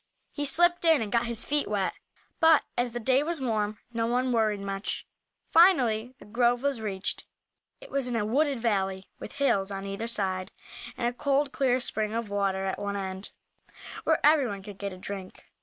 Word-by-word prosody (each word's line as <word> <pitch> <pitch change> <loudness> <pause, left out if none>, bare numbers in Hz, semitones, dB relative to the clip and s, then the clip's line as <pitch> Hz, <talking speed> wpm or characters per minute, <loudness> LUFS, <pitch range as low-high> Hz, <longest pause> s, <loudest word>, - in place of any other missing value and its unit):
He 290 - -3
slipped 345 +4 +3
in 325 -2 +5
and 205 - -6
got 235 0 +2
his 235 0 -3
feet 295 0 0
wet, 200 -2 0 0.5
but 320 -2 +6
as 245 -1 0
the 240 - -3
day 260 +4 +3
was 325 +1 -2
warm 215 -4 -1 0.2
no 230 0 0
one 250 +2 +1
worried 215 -3 +2
much. 195 0 -4 0.5
Finally 255 - +4
the - - -14
grove 240 +3 +2
was 280 -5 0
reached. 200 -3 -4 0.5
It - - -13
was 275 -2 -1
in 245 - -2
a 215 -2 0
wooded 275 +3 +1
valley, 195 -4 -1
with - - -8
hills 235 -9 +1
on 195 -1 -5
either 200 +3 -4
side, 190 -4 -2 0.5
and 240 - 0
a 240 - -1
cold, 280 +1 +1
clear 255 -2 +2
spring 215 -3 -2
of 230 -3 -3
water 195 -1 0
at 190 - -2
one 200 0 -3
end, 190 0 -5 0.7
where 320 -1 +3
everyone 260 -11 +3
could 200 -1 -10
get 200 -1 -3
a 185 - -9
drink. 190 0 -8
230 Hz, 190 wpm, -28 LUFS, 200-270 Hz, 0.7 s, but